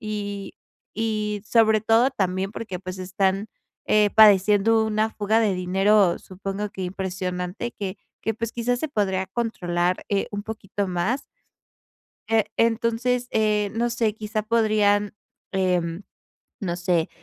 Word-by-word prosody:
Y 205 -2 -5 0.4
y 215 -2 -1
sobre 220 -1 +4
todo 225 +4 +4
también 190 -4 -1
porque, 210 -6 -5
pues, 185 0 -7
están, 190 +2 0 0.4
eh, 210 -1 +4
padeciendo 210 +1 +6
una 215 +1 0
fuga 215 +1 +1
de 210 -4 +2
dinero, 190 +1 +3
supongo 195 +2 -5
que 190 - -7
impresionante, 185 +2 -4
que 195 -1 -5 0.3
que, 225 - +1
pues 230 +1 -4
quizás, 240 +1 -1
se 315 - -2
podría 190 -7 0
controlar, 180 -5 -1
eh, 200 -1 0
un 205 -1 -4
poquito 205 -2 -4
más. 185 +10 -1 1.1
Eh, 225 -1 +3
entonces, 230 +2 +1
eh, 210 -2 +1
no 235 +1 +1
sé, 230 -3 0
quizá 215 0 -3
podrían, 210 -2 +2 0.4
em, 180 -2 0 0.6
no 175 -4 -2
sé, 175 -2 +1
205 Hz, 130 wpm, -24 LUFS, 190-220 Hz, 1.1 s, padeciendo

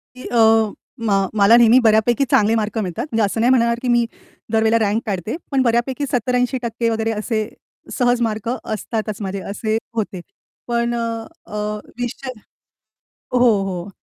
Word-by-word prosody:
की 255 - -11
अ, 225 -2 +4 0.4
मा 200 - +3 0.2
मला 205 +2 +6
नेहमी 235 +1 +6
बऱ्यापैकी 220 +4 +4
चांगले 215 +1 +4
मार्क 215 -1 -2
मिळतात. 185 -2 -2
म्हणजे 225 -1 +2
असं 205 +2 -1
नाही 240 - +4
म्हणणार, 235 -2 +3
की 255 - -3
मी 240 -1 +3 0.5
दर 220 -1 +2
वेळेला 225 +1 +4
रँक 210 +3 0
काढते, 200 - -3 0.2
पण 270 -1 +2
बऱ्यापैकी 250 +3 +1
70-80% 245 -1 0
वगैरे 225 0 0
असे 215 0 -2 0.5
सहज 245 -1 +2
मार्क 220 -2 -1 0.2
असतातच 215 -1 -3
माझे, 195 0 -3
असे 215 +3 -2 0.2
होते. 205 -5 -3 0.5
पण 235 0 0
अ, 230 -1 -3 0.2
अ, - - -9 0.4
विषय 250 +2 -4 1.0
हो, 250 - +3 0.3
हो 180 +1 -5
225 Hz, 155 wpm, -20 LUFS, 215-240 Hz, 1.0 s, मला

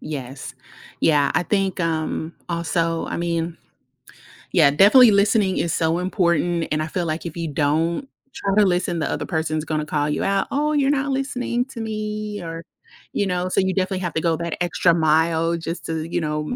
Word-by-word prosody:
yes. 135 -3 -7 0.5
Yeah, 145 -3 +3
I - - +2
think, 195 -1 -1
um, 160 0 -2
also, 165 -1 -1
I - - -4
mean 170 -1 -2 1.0
Yeah, 140 - +5
definitely 215 - +7
listening 200 -1 +3
is 170 - 0
so 165 +1 +1
important 175 -2 0
and 155 - +1
I 155 - -2
feel, 175 +2 -2
like, 160 +1 -3
if 170 -1 -6
you 165 -1 -2
don't 160 - 0 0.3
try 195 -1 -1
to 210 - +6
listen, 175 -2 0
the 155 - -1
other - - -3
person's 155 -2 -2
gonna 155 -1 -2
call 150 -1 -1
you 150 - -1
out, 195 -1 +1
"Oh, 300 +2 +1
you're 280 -2 +2
not 280 -1 0
listening 250 -2 -1
to 260 -3 -8
me," 215 -1 -4
or, 165 -1 -6 0.5
you 200 - 0
know, 180 0 -1
so - - +1
you 190 0 0
definitely 190 0 -1
have 175 -4 -3
to 160 - +1
go 165 -1 +1
that 170 0 -3
extra 175 0 +2
mile 160 +1 +2
just 165 +1 -6
to, 160 -1 -2
you 170 - -1
know, 150 +5 -2
170 Hz, 190 wpm, -22 LUFS, 160-195 Hz, 1.0 s, definitely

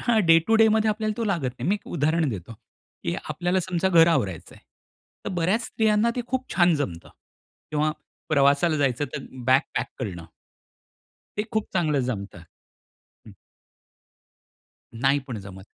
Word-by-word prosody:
हां, 230 -3 +2
day 165 0 +7
to 225 - +4
डेमध्ये 220 0 +4
आपल्याला 215 0 -2
तो 230 - -2
लागत 170 - -1
नाही. - - -2
मी 200 - +3
एक 210 - -8
उदाहरण 160 0 +1
देतो, 100 0 -7 0.5
की 85 - -1
आपल्याला 175 +4 0
समजा 185 +1 0
घर 170 -3 +6
आवरायचं 100 - -1
आहे. - - -21 0.6
तर - - -3
बऱ्याच 190 +7 +1
स्त्रियांना 220 +1 +2
ते 245 - 0
खूप 260 0 -3
छान 175 -2 +4
जमतं 85 -12 -4 0.6
किंवा 155 0 +1 0.4
प्रवासाला 145 +2 +3
जायचं 140 -1 +1
तर 140 - -5 0.2
बॅग 130 +1 +6 0.2
पॅक - - 0
करणं. 90 -9 -5 1.1
ते 210 - +1
खूप 220 -1 0
चांगलं 150 -4 +2
जमत. 105 -7 -4 0.9
हं. - - -12 1.7
नाही 135 +2 +3
पण 120 -4 -4
जमत. 95 -1 -11
165 Hz, 150 wpm, -25 LUFS, 130-210 Hz, 1.7 s, day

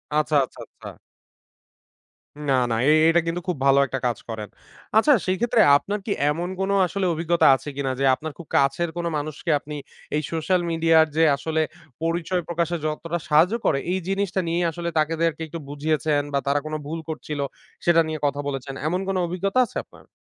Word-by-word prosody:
আচ্ছা, 155 0 +1
আচ্ছা, - - -14
আচ্ছা। - - -13 1.6
না, - - +4 0.2
না। - - +1
এ - - +7 0.2
এটা 170 +1 +4
কিন্তু 170 +1 -2
খুব 175 -5 -1
ভালো 135 0 +5
একটা 135 0 -4
কাজ 120 -3 0
করেন। 110 -2 -5 0.5
আচ্ছা 290 +7 +6
সেক্ষেত্রে 220 +5 +2 0.2
আপনার 205 +7 -4
কি 210 - -3 0.2
এমন 170 +4 -2
কোন 195 +1 0 0.2
আসলে 195 +1 -2
অভিজ্ঞতা 170 +1 +2
আছে 145 - -7
কিনা? 135 -2 -1
যে 135 - +2
আপনার 155 +3 -6
খুব 170 - -11
কাছের 140 +5 +2
কোনো 170 0 -1
মানুষকে 155 +2 -3
আপনি 150 +1 -8 0.4
এই 150 - +1
সোশ্যাল 175 +3 +1
মিডিয়ার 165 -1 +4
যে 165 - +5
আসলে 160 +2 -1 0.4
পরিচয় 170 +2 0
প্রকাশের 170 0 -1
যতটা 165 +2 -2
সাহায্য 160 +6 +4
করে 140 - +2
এই 190 - 0
জিনিসটা 195 -1 0
নিয়েই 170 +1 0
আসলে 170 +1 -4
তাদেরকে 165 +1 0
একটু 165 +2 -7
বুঝিয়েছেন 150 0 0
বা 140 - +2
তারা 145 +1 +2
কোন 155 - -5
ভুল 165 +2 -4
করছিল, 150 -1 -5 0.5
সেটা 170 -1 +5
নিয়ে 155 -1 -4
কথা 140 0 0
বলেছেন? 135 0 -4
এমন 180 +3 0
কোন 195 - -1
অভিজ্ঞতা 195 +7 0
আছে - - -8
আপনার? - - -19
165 Hz, 180 wpm, -24 LUFS, 150-175 Hz, 1.6 s, এ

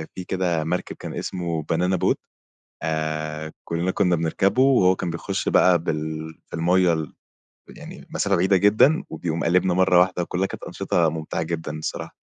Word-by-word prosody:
في 95 - -5
كده 90 -3 -1
مَركَب 85 +3 -3
كان - - -8
اسمه 85 -3 -3
بانانا 90 +5 0
بوت، 90 - +1 0.7
آآ 80 0 -3
كُلّنا 85 +2 -1
كنا 90 -1 +2
بنركَبُه 85 +8 +1
وهو 125 -9 +5
كان 90 - -3
بيخش 85 0 -3
بقى 90 -1 +5
بال 80 0 -4 0.2
في - - -6
المَيّة 90 +1 +3
ال 80 -4 -4 0.6
يعني - - -11
مسافة 100 -1 +1
بعيدة 95 +3 +3
جدًا 110 - +4
وبيقوم 80 0 -3
قالبنا 90 +1 +2
مَرّة 90 -1 +4
واحدة، 90 0 +1
وكُلّها 90 +2 -1
كانت - - -8
أنشطة 85 -2 0
ممتعة 80 0 -3
جدًا 80 -1 -4
الصراحة. 80 - -5
85 Hz, 160 wpm, -23 LUFS, 80-95 Hz, 0.7 s, وهو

